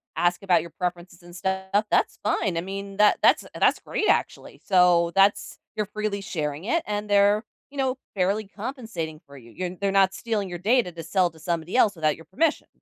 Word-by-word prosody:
ask 175 0 +1
about 180 -4 +3
your 170 +1 -10
preferences 175 0 -5
and 175 0 -14
stuff, 190 +2 -1
that's - - +2
fine, 200 -4 0
I - - 0
mean, 195 +2 -7
that 210 0 +4
that's - - +4
that's - - +3
great 430 - -2
actually. - - -1
So, 180 -3 +4
that's 195 +1 +3 0.2
you're 210 - -1
freely 210 0 -3
sharing 155 -3 -4
it, 330 +8 +1
and 210 0 -3
they're, 205 +2 +4 0.2
you 285 - -13
know, 265 -1 0 0.2
fairly 200 +3 0
compensating 210 - -6
for 140 0 -14
you, 115 -2 -15
you're 180 +4 -5
they're 200 -1 0
not 195 -1 +4
stealing 210 -3 -2
your 175 - -5
data 220 0 +2
to 165 -1 -8
sell 180 +2 +1
to 160 - -18
somebody 170 +3 -3
else 210 -6 +4
without 155 -2 +1
your 165 - -15
permission. 305 +11 0
190 Hz, 200 wpm, -25 LUFS, 175-210 Hz, 0.2 s, that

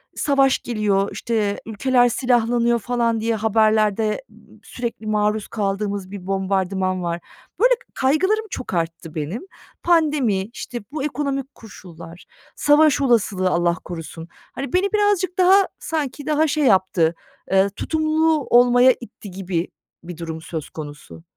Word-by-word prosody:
savaş 275 -2 +2
geliyor, 205 -4 0
işte, 215 -3 -1
ülkeler 245 +3 +2
silahlanıyor 235 -1 +1
falan 235 0 0
diye 230 0 0
haberlerde 215 - +2 0.4
sürekli 235 -2 -6
maruz 210 0 0
kaldığımız 200 -2 -3
bir 195 -2 -8
bombardıman 190 -1 -1
var. 170 0 -2 0.4
Böyle - - +5 0.2
kaygılarım 375 +11 +1
çok 255 - -6
arttı 165 -2 -3
benim. 160 +9 -4 0.4
Pandemi, 300 - +2
işte, 240 +2 -7
bu 295 -2 -4
ekonomik 275 -1 -3
koşullar, 170 -6 -12 0.3
savaş 295 0 +4
olasılığı 215 -7 +2
Allah 175 -1 +1
korusun. 165 -1 -8 0.3
Hani, 275 +4 -6
beni 380 +3 +1
birazcık 410 -3 +1
daha 370 +1 +6 0.2
sanki 295 -3 -4
daha 310 +1 +2
şey 300 +1 0
yaptı, 185 -6 +3 0.4
eee, 195 +1 +4
tutumlu 315 +5 0
olmaya 245 +1 +6
itti 210 -3 -11
gibi 180 -2 -3 0.4
bir 175 -1 -8
durum 160 -1 -6
söz 160 -2 -6
konusu. 145 - -10
220 Hz, 125 wpm, -21 LUFS, 190-275 Hz, 0.4 s, daha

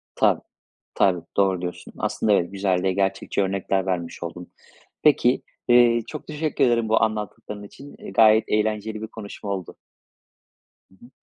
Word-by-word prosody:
Tabii, - - +3 0.5
tabii. 90 -3 +3 0.2
Doğru 95 -2 +2
diyorsun. 90 0 -6
Aslında, 105 - 0
evet, 90 -2 +2
güzel 95 -2 0
ve 95 -1 +1
gerçekçi 95 +1 0
örnekler 95 0 -1
vermiş 85 -2 -3
oldun. 90 +1 -7 0.5
Peki, 135 -4 +4 0.3
eee, 120 -1 +5
çok 155 - -8
teşekkür 150 -1 -1
ederim 115 -2 +1
bu 110 - +3
anlattıkların 105 -1 -4
için. 140 +7 -12
Eee, - - -9
gayet 110 +1 +6
eğlenceli 110 0 -1
bir 110 - -4
konuşma 105 -2 -8
oldu. 95 -3 -4 1.2
Hı - - -21
hı. - - -17
105 Hz, 150 wpm, -23 LUFS, 95-110 Hz, 1.2 s, gayet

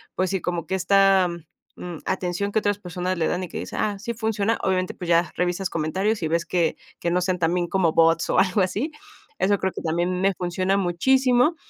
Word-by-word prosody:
pues, 185 0 0
sí, 190 - -1
como 175 -2 -3
que 190 - -5
esta, 195 0 +4 0.5
mm, 175 -2 -6
atención 190 +2 -2
que 220 - +2
otras 205 -1 -1
personas 180 0 -3
le 160 - +1
dan 180 +1 -1
y - - -4
que - - -6
dice: - - -7
"Ah, 205 -2 -1
sí 235 +3 -4
funciona", 220 0 0
obviamente, 185 -1 0
pues, 180 - -7
ya 170 0 +3
revisas 180 +1 -1
comentarios, 185 +6 -1
y - - +1
ves 170 +1 0
que 175 -2 +1 0.2
que 170 - -1
no 180 +1 +2
sean 180 0 0
también 175 +1 +1
como 175 -3 +1
bots 165 0 +3
o - - +3
algo 190 +1 +3
así. 205 - -1 0.5
Eso 200 +1 +2
creo 190 -1 0
que - - -6
también 175 +3 -1
me 195 0 +3
funciona 185 +2 -1
muchísimo 250 - +3
185 Hz, 215 wpm, -24 LUFS, 175-200 Hz, 0.5 s, esta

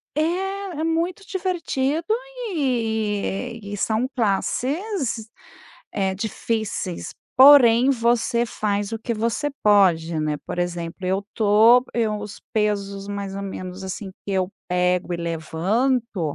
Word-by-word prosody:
É, 305 - +2 0.6
é - - -1
muito 335 +4 -1
divertido 335 -6 -1 0.5
e 230 - -1
e 205 0 -6
são 220 +4 0
classes, 255 - -1 0.6
eh, 190 -2 0
difíceis, 215 -3 -3 0.2
porém 260 -2 +8
você 235 -1 +2
faz 205 -2 -2
o 225 - -2
que 230 +1 -3
você 230 +7 -1
pode, 175 -6 +4
né. 155 -1 -1
Por - - -5
exemplo, 175 +1 -3
eu 190 +2 0
tô 220 +3 +6
eu 220 -3 0
os 210 0 -8
pesos, 200 -2 -1
mais 200 -1 -4
ou 200 - -4
menos 185 -1 -6
assim, 190 +1 -5 0.2
que - - -3
eu 190 0 0 0.2
pego 180 0 +1
e - - -2
levanto, 170 - -1
215 Hz, 125 wpm, -23 LUFS, 190-245 Hz, 0.6 s, porém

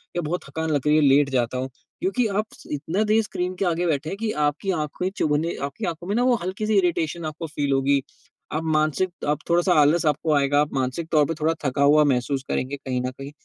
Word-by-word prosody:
या 175 - 0
बहुत 170 +3 -3
थकान 160 +3 -3
लग 145 -3 +1
रही 150 - +5
है, - - +4
लेट 140 0 +5
जाता 125 -1 0
हूँ। 130 +1 -3 0.3
क्योंकि 230 +6 +1
आप 210 +1 -1 0.3
इतना 160 +8 -1
देर 215 +1 +3
स्क्रीन 180 -3 -3
के 195 - -1
आगे 175 0 0
बैठे 155 -1 -1
हैं 195 - -4
कि 220 0 -2
आपकी 150 +7 -1
आँखे 160 +2 -2
चुभने 155 +2 0
आपकी 140 0 -4
आँखों 170 0 -4
में 200 - -1
ना 240 - +2
वो 250 -1 +4
हल्की-सी 210 +3 -1
इरिटेशन 170 -3 0
आपको 155 +2 -5
फ़ील 145 -2 -2
होगी। 135 +1 +2 0.5
अब 155 +2 -1
मानसिक 155 +4 +1 0.2
अब 150 0 +1
थोड़ा-सा 175 +2 +3
आलस 155 +4 +3
आपको 155 +1 +1
आएगा, 145 0 +3
आप 150 - -2
मानसिक 135 +5 -2
तौर 150 -2 +4
पे 165 - -2
थोड़ा 160 +2 +2
थका 140 +1 0
हुआ 150 +2 +6
महसूस 135 0 0
करेंगे 130 +2 -1
कहीं 130 -2 -3
न 125 0 -2
कहीं। 135 +2 -9
155 Hz, 230 wpm, -24 LUFS, 140-175 Hz, 0.5 s, हुआ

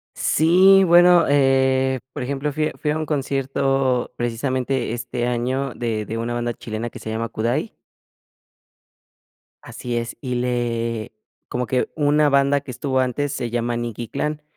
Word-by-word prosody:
Sí, 185 +5 +5
bueno, 175 0 +6
eh, 130 -1 +2
por - - -5
ejemplo, 140 +3 -2
fui 155 +2 -1
fui 150 - 0
a 150 - -1
un 155 0 -3
concierto 135 -3 0
precisamente 125 +1 -1
este 120 0 -3
año 125 +2 -1
de 110 -3 -3
de 115 - -4
una 115 +1 -3
banda 120 0 -2
chilena 115 +1 -5
que - - -10
se 110 - -7
llama 115 +1 -2
Kudai. 115 +2 -2 1.9
Así 120 -1 -5
es, 115 0 -4
y 125 -1 -3
le 115 -2 -2 0.4
como 125 0 -2
que 125 +1 0
una 150 0 +3
banda 140 0 +3
que 140 - -10
estuvo 130 +1 -1
antes 135 +3 -1
se 125 -4 -3
llama 120 0 -1
Nikki 120 -1 -4
Clan. 150 +2 -3
130 Hz, 150 wpm, -22 LUFS, 120-140 Hz, 1.9 s, bueno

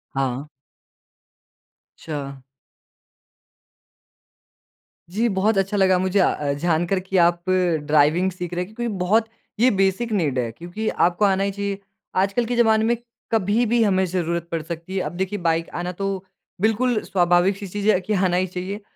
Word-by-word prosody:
हाँ। 135 +1 -2 1.5
अच्छा। 140 -4 -6 2.7
जी, 225 +6 0
बहुत 195 +2 +1
अच्छा 195 +2 0
लगा 190 -1 +4
मुझे 190 +2 +1
अ - - +5
अ, 140 -1 -2
जानकर 170 +5 0
कि 190 0 -2
आप 175 0 +1
ड्राइविंग 165 -1 +2
सीख 180 -1 -6
रहे 180 +1 -1
हैं 210 +4 -12
क्योंकि 240 -3 -2
बहुत 215 +5 +2 0.3
ये 250 +2 +5
बेसिक 195 +4 +1
नीड 150 -11 0
है 115 -2 -2
क्योंकि 175 - -6
आपको 180 +4 +2
आना 195 0 +2
ही 200 - 0
चाहिए, 200 0 -3 0.4
आजकल 200 +5 +1
के 245 +1 -2
ज़माने 220 -2 +4
में 235 +1 +2 0.4
कभी 220 +2 +2
भी 235 +1 +2
हमें 190 -2 +2
ज़रूरत 170 -1 -2
पड़ 165 -1 -1
सकती 170 +3 -7
है। - - +1
अब - - -4
देखिए 190 +1 -2
बाइक 165 -1 0
आना 180 +1 -3
तो 195 +2 -3 0.5
बिल्कुल 225 +1 +2
स्वाभाविक-सी 185 +2 +2
चीज़ 205 +3 -1
है 185 - +4
कि 210 +3 -2
आना 185 -2 +2
ही 185 +1 +1
चाहिए 185 +4 -5
185 Hz, 160 wpm, -22 LUFS, 170-205 Hz, 2.7 s, अ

